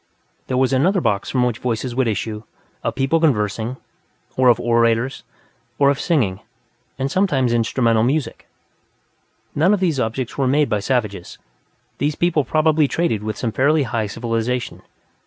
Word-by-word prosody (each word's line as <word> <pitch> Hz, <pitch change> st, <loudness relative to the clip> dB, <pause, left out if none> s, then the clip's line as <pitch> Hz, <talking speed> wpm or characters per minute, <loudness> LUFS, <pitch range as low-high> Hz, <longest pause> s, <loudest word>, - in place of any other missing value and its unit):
There 130 Hz, -, -1 dB
was 130 Hz, +1 st, +2 dB
another 180 Hz, +9 st, +2 dB
box 100 Hz, -, -1 dB
from 125 Hz, -2 st, +1 dB
which 120 Hz, -2 st, -1 dB
voices 120 Hz, 0 st, -2 dB
would 130 Hz, 0 st, +1 dB
issue, 110 Hz, 0 st, -3 dB, 0.4 s
of -, -, -2 dB
people 135 Hz, +5 st, +1 dB
conversing, 115 Hz, -4 st, 0 dB, 0.6 s
or 130 Hz, -1 st, +4 dB
of 120 Hz, -, +4 dB
orators, 115 Hz, +2 st, +1 dB, 0.5 s
or 140 Hz, -1 st, +4 dB
of 140 Hz, -, -3 dB
singing, 115 Hz, -, 0 dB, 0.6 s
and 135 Hz, +1 st, -2 dB
sometimes 135 Hz, -11 st, +1 dB
instrumental 115 Hz, -1 st, +2 dB
music. 135 Hz, +5 st, -1 dB, 1.1 s
None 175 Hz, +8 st, +3 dB
of -, -, -5 dB
these 170 Hz, -7 st, 0 dB
were -, -, +2 dB
objects 115 Hz, +2 st, -4 dB
made 140 Hz, +1 st, +2 dB
by 105 Hz, -2 st, 0 dB
savages; 100 Hz, -5 st, -2 dB, 0.6 s
these 145 Hz, +2 st, 0 dB
people 170 Hz, -3 st, +1 dB
probably 155 Hz, 0 st, +2 dB
traded 135 Hz, -10 st, -1 dB
with 110 Hz, 0 st, -4 dB
some 115 Hz, -, -2 dB
fairly 145 Hz, +5 st, +2 dB
high 115 Hz, -3 st, -2 dB
civilization. 115 Hz, +2 st, -3 dB
125 Hz, 155 wpm, -20 LUFS, 115-145 Hz, 1.1 s, or